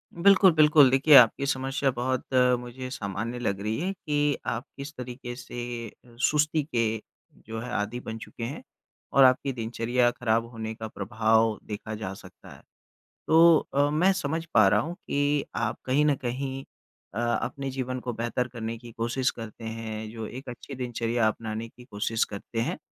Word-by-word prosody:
बिल्कुल, 190 +2 +6
बिल्कुल 150 -3 +6
देखिए 140 +3 +6
आपकी 125 +2 +7
समस्या 135 0 0
बहुत 130 +2 -2 0.3
मुझे 125 +1 -7
सामान्य 110 +1 -4
लग 100 -5 -1
रही 110 +2 -2
है 185 +4 -1
कि 150 -4 0
आप 120 +1 -2
किस 140 +1 -6
तरीके 125 0 -7
से 120 -2 -6 0.4
सुस्ती 150 +1 +2
के 125 -5 -1 0.7
जो 110 0 -5
है 120 +2 -6
आदि 105 +3 -2
बन 110 -2 -6
चुके 115 - -9
हैं 125 +5 -5 0.5
और 135 - +7
आपकी 130 +2 +4
दिनचर्या 120 +1 +1
खराब 115 -2 0
होने 110 -1 -5
का 110 0 -6
प्रभाव 110 0 +1
देखा 110 +1 -5
जा 95 -3 -5
सकता - - -14
है। - - -17 0.7
तो 165 0 +7 0.2
अ, 145 +1 +4
मैं 170 +6 +3
समझ 165 -2 -2
पा 110 -3 +6
रहा 105 +1 +4
हूँ 165 +9 -3
कि 145 0 +1
आप 110 -2 -1
कहीं 140 +4 +3
न 145 -2 +3
कहीं 135 +2 -3 0.5
अ, 105 - -3
अपने 120 +3 -1
जीवन 130 -1 -3
को 125 -1 -4
बेहतर 120 +2 -2
करने 115 -2 -5
की 120 0 -12
कोशिश 120 +3 0
करते 115 0 -9
हैं, 110 -1 -5
जो 115 -1 -6
एक 130 +1 -8
अच्छी 125 +3 -8
दिनचर्या 120 -2 0
अपनाने 110 +1 -3
की 125 - -16
कोशिश 110 -1 -1
करते 110 +3 -5
हैं - - -2
120 Hz, 175 wpm, -27 LUFS, 115-140 Hz, 0.7 s, आपकी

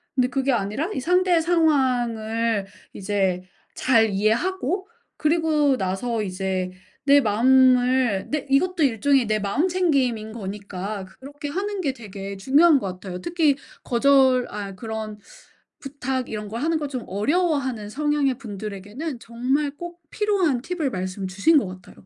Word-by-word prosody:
근데 250 -1 +2
그게 270 +1 0
아니라 220 - -1
이 - - -2
상대의 360 +2 +3
상황을 240 - +1 0.3
이제 190 -2 -1 0.3
잘 225 -4 +3
이해하고 345 - 0 0.3
그리고 305 -3 +2
나서 215 +4 -2
이제 185 -1 -2 0.3
내 285 0 +7
마음을 250 -1 +3
내 300 -2 -2
이것도 340 +5 +2
일종의 265 0 +2
내 215 0 +1
마음챙김인 265 - 0
거니까 200 -2 -6
그렇게 290 +2 -7
하는 395 +5 -3
게 285 -6 0
되게 200 -4 -8
중요한 285 - +5
것 200 - -4
같아요. 180 0 -6
특히 320 - +2 0.3
거절 260 0 +4
아 200 -1 -6
그런 220 0 -6 0.6
부탁 265 -2 -4
이런 210 -1 -5
거 225 - -5
하는 315 +5 0
거 295 - -3
좀 255 -4 -5
어려워하는 265 - 0
성향의 290 0 0
분들에게는 215 - -6
정말 255 +6 -1
꼭 345 0 -8
필요한 380 - +1
팁을 325 -1 -2
말씀 185 0 -4
주신 200 - +3
것 240 - +1
같아요. 185 0 -12
255 Hz, 295 characters per minute, -23 LUFS, 210-295 Hz, 0.6 s, 내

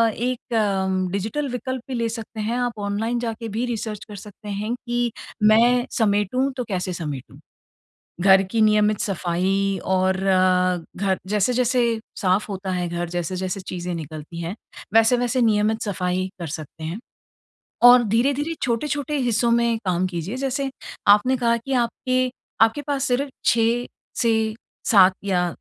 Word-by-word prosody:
एक 205 -6 0
डिजिटल 220 +10 -2
विकल्प 255 +1 -4
भी - - -3
ले 230 -1 0
सकते 225 0 -7
हैं, 225 +3 -1
आप 245 -3 -2
ऑनलाइन 225 +4 -1
जाके 230 -1 -4
भी 225 +4 -2
रिसर्च 220 -3 -4
कर 210 - -10
सकते 210 +1 -10
हैं 205 +3 -2
कि 240 -1 -2 0.3
मैं 235 +3 +5
समेटूँ 220 +4 +1
तो 250 - -1
कैसे 185 -2 -2
समेटूँ? 150 -7 -6 0.8
घर 190 +1 +6
की 195 +4 -2
नियमित 210 -1 +4
सफाई 195 +1 0
और 185 0 +2 0.8
घर 190 0 0
जैसे-जैसे 245 +5 +1 0.4
साफ 190 +2 +1
होता 190 -1 -4
है 180 -1 -1
घर 175 0 -3
जैसे-जैसे 185 +2 -3
चीज़ें 180 -1 -5
निकलती 155 +1 -7
हैं, 170 +3 -4 0.4
वैसे-वैसे 240 +2 +3
नियमित 220 0 +2
सफाई 185 -2 -1
कर 170 - -5
सकते 160 +1 -10
हैं। 165 +5 -4 0.9
और 245 0 +7
धीरे-धीरे, 270 +8 +1
छोटे-छोटे 285 +4 -1
हिस्सों 240 -3 +1
में 235 -1 +2
काम 180 0 +1
कीजिए 180 +4 -4
जैसे 275 +1 -1 0.4
आपने 210 +6 +5
कहा 235 -1 +2
कि 250 +4 -5
आपके, 255 +1 0 0.3
आपके 225 +6 +4
पास 280 -2 0
सिर्फ 265 +3 0 0.2
6 235 +1 +2 0.4
से 220 -2 +1 0.3
7 190 -3 +6
या 180 -3 +1
215 Hz, 145 wpm, -23 LUFS, 190-240 Hz, 0.9 s, और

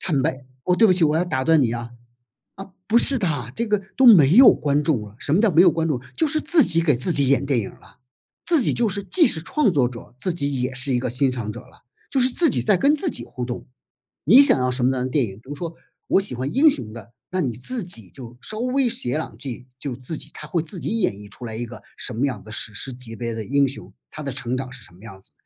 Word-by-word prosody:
坦 145 -7 0
白 - - 0 0.3
我 180 - +2
对 225 - +5
不 185 - +4
起， 180 -2 +3
我 150 0 +2
要 175 - +1
打 130 -6 -2
断 160 0 +4
你 115 -3 +1
啊。 120 0 -6 0.7
啊， 195 0 -10 0.2
不 225 - +3
是 270 +3 +4
的， 145 - -2
这 235 - -2
个 210 -1 0
都 265 - +3
没 170 - +7
有 260 +1 +9
观 145 0 0
众 150 -7 0
了， 105 0 -11
什 145 - -2
么 175 - +3
叫 225 -1 +3
没 165 +1 +5
有 185 - +6
观 165 0 -1
众？ 130 -6 -2
就 320 - +1
是 310 +1 0
自 320 0 +4
己 165 -5 +3
给 160 -3 +2
自 130 +9 0
己 140 -3 +2
演 140 0 +2
电 135 -3 +1
影 100 - -4
了， 125 - -20 0.5
自 330 -6 +4
己 - - +1
就 235 -2 0
是 200 +1 -3
既 335 - +3
是 195 - +1
创 245 - +1
作 135 -7 +2
者， 120 -1 -11
自 180 +7 0
己 140 -5 -2
也 125 +1 -2
是 130 +1 -1
一 125 - +1
个 125 - -3
欣 130 +2 +1
赏 115 -4 -4
者 120 - -9
了， - - -22 0.3
就 275 - 0
是 255 0 +4
自 325 +4 +3
己 - - 0
在 210 - +3
跟 280 - +3
自 330 +3 0
己 - - -2
互 125 -2 -6
动。 120 0 -7 0.6
你 235 - +8
想 280 - +5
要 125 0 0
什 125 -1 0
么 130 - +2
样 125 - -1
的 - - -3
电 135 -1 +1
影？ 95 -3 -9
比 110 - -19
如 145 - -6
说， 165 +2 -6 0.3
我 - - +3
喜 130 -10 -2
欢 130 +3 -4
英 300 +5 +5
雄 115 - -4
的， 115 +1 -12 0.2
那 185 - -2
你 130 -9 -1
自 180 - -5
己 110 - -6
就 120 -2 -11
稍 215 +10 -6
微 255 +1 +1
写 225 - -2
两 155 +3 -4
句， 125 -2 -7
就 135 -3 -5
自 130 +6 -4
己 150 - -8
它 - - -9
会 170 - -1
自 165 +2 -6
己 225 +1 -2
演 180 - +1
绎 100 +1 -13
出 120 +4 -11
来 110 -1 -6
一 120 +2 -4
个 - - -11 0.2
什 - - -3
么 120 +5 0
样 135 -3 -4
的 110 - -12
史 105 0 0
诗 130 +5 -4
级 120 -2 -9
别 115 0 -4
的 110 -1 -6
英 140 +2 +2
雄， 135 - -10 0.2
他 155 - -8
的 140 -3 -4
成 125 +1 -3
长 130 0 -5
是 125 - -11
什 - - -16
么 90 - -19
样 95 -4 -11
子。 - - -9
140 Hz, 310 characters per minute, -22 LUFS, 125-195 Hz, 0.7 s, 有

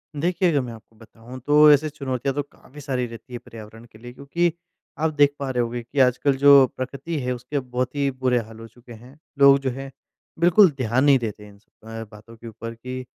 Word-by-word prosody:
देखिए, 175 +4 0
अगर 145 -3 +1
मैं 120 -2 -7
आपको 110 0 -17
बताऊँ 115 +3 -13
तो 150 +1 +7
ऐसे 150 +2 +3
चुनौतियाँ 135 -2 -3
तो 145 - 0
काफ़ी 145 0 -16
सारी 130 -3 -2
रहती 115 +2 -12
हैं 120 - -5
पर्यावरण 110 0 -12
के 110 -2 -19
लिए, 120 +1 -11
क्योंकि 155 +6 -1 0.5
आप 160 0 0
देख 145 -1 +3
पा 140 -1 -4
रहे 125 -2 0
होंगे 120 +1 -4
कि 135 +4 -5
आजकल 130 +2 +2
जो 140 -1 +7
प्रकृति 140 +5 -5
है 125 0 -2
उसके 125 +4 -4
बहुत 125 +1 -4
ही 140 -1 0
बुरे 130 -1 0
हाल 115 0 -10
हो 115 - -10
चुके 120 +1 -16
हैं। 125 +6 -15 0.2
लोग 140 0 +7
जो 135 -1 -2
है 135 +2 -8 0.5
बिल्कुल 175 +2 +5
ध्यान 125 0 0
नहीं 140 -2 +5
देते 110 -3 -6
हैं 105 - -14
इन 100 - -19
स 105 - -36 0.2
अ, 115 0 -7
बातों 110 +2 -15
के 115 - -12
ऊपर 115 +1 -8
कि 125 +2 -7
130 Hz, 230 wpm, -22 LUFS, 115-140 Hz, 0.5 s, तो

